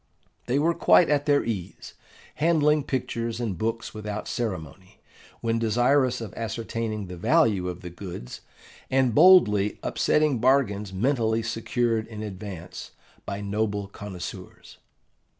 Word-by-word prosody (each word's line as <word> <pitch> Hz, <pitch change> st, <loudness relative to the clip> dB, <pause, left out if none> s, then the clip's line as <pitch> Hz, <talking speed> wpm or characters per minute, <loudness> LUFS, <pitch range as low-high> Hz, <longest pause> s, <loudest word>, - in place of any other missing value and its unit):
They 125 Hz, +3 st, +1 dB
were 165 Hz, +4 st, +2 dB
quite 170 Hz, -1 st, +4 dB
at 145 Hz, 0 st, +1 dB
their 145 Hz, -1 st, +3 dB
ease, 100 Hz, -6 st, -5 dB, 0.4 s
handling 150 Hz, -2 st, +3 dB
pictures 115 Hz, -3 st, -3 dB
and 110 Hz, -6 st, -2 dB
books 115 Hz, +5 st, -3 dB
without 105 Hz, 0 st, -5 dB
ceremony, 95 Hz, -, -5 dB, 0.4 s
when 115 Hz, 0 st, 0 dB
desirous 120 Hz, +3 st, +2 dB
of 110 Hz, -4 st, -7 dB
ascertaining 110 Hz, -1 st, -4 dB
the 90 Hz, -1 st, -8 dB
value 105 Hz, -, +2 dB
of 90 Hz, 0 st, -7 dB
the 90 Hz, -, -8 dB
goods, 85 Hz, -9 st, -8 dB, 0.5 s
and 130 Hz, -3 st, +2 dB
boldly 105 Hz, -, +5 dB
upsetting 150 Hz, -5 st, +1 dB
bargains 110 Hz, -6 st, +2 dB
mentally 115 Hz, +1 st, 0 dB
secured 115 Hz, 0 st, -1 dB
in 110 Hz, -2 st, -7 dB
advance 95 Hz, -4 st, -8 dB, 0.3 s
by 100 Hz, 0 st, -4 dB
noble 105 Hz, 0 st, -2 dB
connoisseurs. 100 Hz, -3 st, -9 dB
110 Hz, 125 wpm, -25 LUFS, 100-130 Hz, 0.5 s, boldly